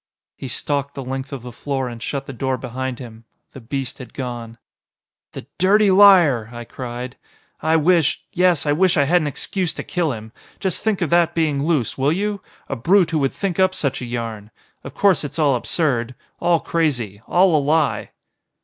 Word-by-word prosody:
He 135 - -7
stalked 140 +2 -2
the 135 - -5
length 135 +1 -5
of 135 -4 -6
the 125 - -8
floor 135 +2 -3
and 120 -2 -8
shut 140 +3 -4
the 135 - -7
door 130 +1 -1
behind 130 +1 -4
him. 115 -3 -11 0.3
The - - -10
beast 130 +2 -4
had 125 - -11
gone. 120 -3 -6 0.8
"The - - -8
dirty 200 +2 +4
liar!" 175 - +6
I 120 0 -7
cried. 125 +1 -7 0.4
"I 160 +1 +2
wish 165 -1 +2
yes 180 -4 +2
I 145 - +2
wish 175 +4 +3
I 140 - +5
had 175 +5 +3
an 150 - -1
excuse 180 +5 -2
to - - -5
kill 175 -4 -1
him. 110 -2 -8 0.3
Just 190 -3 -1
think 210 -4 +1
of 170 - -3
that 170 -1 +3
being 150 -4 +1
loose, 150 -7 0
will 140 +3 +2
you? 200 +3 -2 0.3
A 135 - -3
brute 175 - +3
who 160 - +1
would 135 -2 +1
think 195 -3 -3
up 185 0 +3
such 140 -3 -2
a - - -4
yarn! 115 -3 -5 0.3
Of - - -9
course 195 -5 +3
it's 145 +1 -6
all 150 -4 +3
absurd. 125 -2 0 0.2
All 170 -1 +2
crazy. 125 - -1
All 180 -1 +4
a 150 - +3
lie." 150 0 +1
140 Hz, 195 wpm, -21 LUFS, 125-170 Hz, 0.8 s, liar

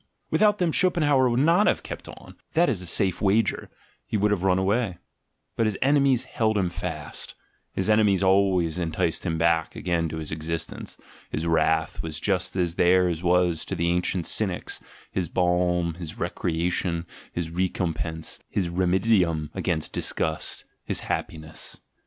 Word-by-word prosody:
Without 210 -1 +4
them 175 -4 +1
Schopenhauer 150 -8 +3
would 120 +2 +2
not 170 +7 +4
have - - +1
"kept - - -7
on," - - -12 0.2
that 170 +2 +4
is 105 -9 -1
a 90 - -5
safe 95 +1 +1
wager; 105 +3 +1 0.4
he - - -1
would 105 +1 +2
have 100 -4 +1
run 95 -1 +3
away: 100 0 0 0.6
but 115 - +2
his 105 - -1
enemies 135 -2 +3
held 110 -4 0
him 90 -3 0
fast, 85 -5 -6 0.4
his 95 - -1
enemies 105 -3 +4
always 95 -3 +3
enticed 80 -1 -1
him 80 -1 0
back 80 0 +1
again 85 -2 -1
to 80 - -5
existence, 80 +1 -5 0.3
his 80 - -3
wrath 80 -1 +1
was 80 -1 -4
just 95 -1 -1
as 90 -2 0
theirs 90 -2 +3
was 90 -2 +2
to - - -4
the 85 +1 0
ancient 90 0 0
Cynics, - - +1 0.3
his 90 -4 -2
balm, 90 -1 +1
his 85 -2 -7
recrea 85 +1 -1
tion, 85 -2 -1 0.3
his 85 -2 -4
recompense, 85 -2 -2
his 90 -4 -1
remcd'nim 90 -3 +2
against 80 -4 -1
disgust, 80 0 -1 0.2
his - - -3
liappiness. 80 -1 -5
90 Hz, 155 wpm, -25 LUFS, 85-105 Hz, 0.6 s, Without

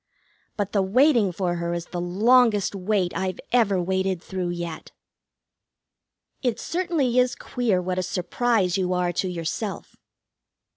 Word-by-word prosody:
But 205 -1 -2
the 200 - +2
waiting 230 +1 +3
for 175 -1 -2
her 170 0 -2
is 170 0 -4
the 175 - -5
longest 210 +4 +3
wait 195 -2 -1
I've 185 +1 -2
ever 215 -6 +3
waited 190 0 0
through 180 0 -4
yet. 170 -2 -5 1.5
It 245 -4 -1
certainly 330 -9 0
is 250 0 +2
queer 230 -7 -1
what 185 0 -1
a - - +1
surprise 190 +1 0
you 185 -1 0
are 180 -1 0
to 185 - -1
yourself. 180 +4 -4
190 Hz, 140 wpm, -24 LUFS, 180-230 Hz, 1.5 s, waiting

